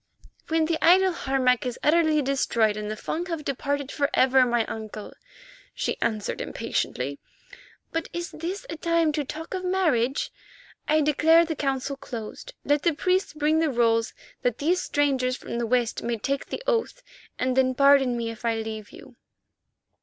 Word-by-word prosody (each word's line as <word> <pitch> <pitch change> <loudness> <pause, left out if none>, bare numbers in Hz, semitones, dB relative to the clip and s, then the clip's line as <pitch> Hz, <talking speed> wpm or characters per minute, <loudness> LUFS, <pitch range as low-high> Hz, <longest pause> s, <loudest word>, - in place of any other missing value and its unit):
"When 320 0 +2
the 320 0 -1
idol 375 +2 +6
Harmac 265 -6 +1
is 250 -1 -3
utterly 310 -1 +3
destroyed, 235 -5 +1
and 210 0 -4
the 215 - -3
Fung 335 +10 -4
have 330 -4 -4
departed 280 +1 -2
for 285 -1 0
ever, 260 0 +5
my 240 -2 +1
uncle," 215 -1 -7 0.6
she - - -2
answered 215 -2 -1
impatiently. 140 +3 -3 0.7
"But 330 0 -2
is 345 +1 -5
this 355 +5 -5
a 330 - -5
time 335 -1 +2
to 300 -1 -1
talk 315 +6 -7
of 375 -1 -3
marriage? 315 -9 +1 0.6
I 310 +1 +3
declare 320 +3 +5
the 320 -1 -3
Council 275 -1 -2
closed. 270 - -8
Let 290 0 +2
the 335 -2 +1
priests 370 +3 0
bring 305 +1 +1
the 325 -1 +2
rolls 230 -3 +1 0.3
that 245 -2 0
these 350 +5 +1
strangers 265 -3 0
from 235 - -5
the 235 - -1
West 240 -1 0
may 235 0 -2
take 275 +6 -2
the - - -5
oath, - - -1 0.3
and 255 0 0
then 260 -1 +2
pardon 275 -2 +5
me 230 -1 -2
if 225 - -12
I 230 -1 +1
leave 220 -1 -5
you." 250 -3 -14
275 Hz, 170 wpm, -25 LUFS, 240-325 Hz, 0.7 s, idol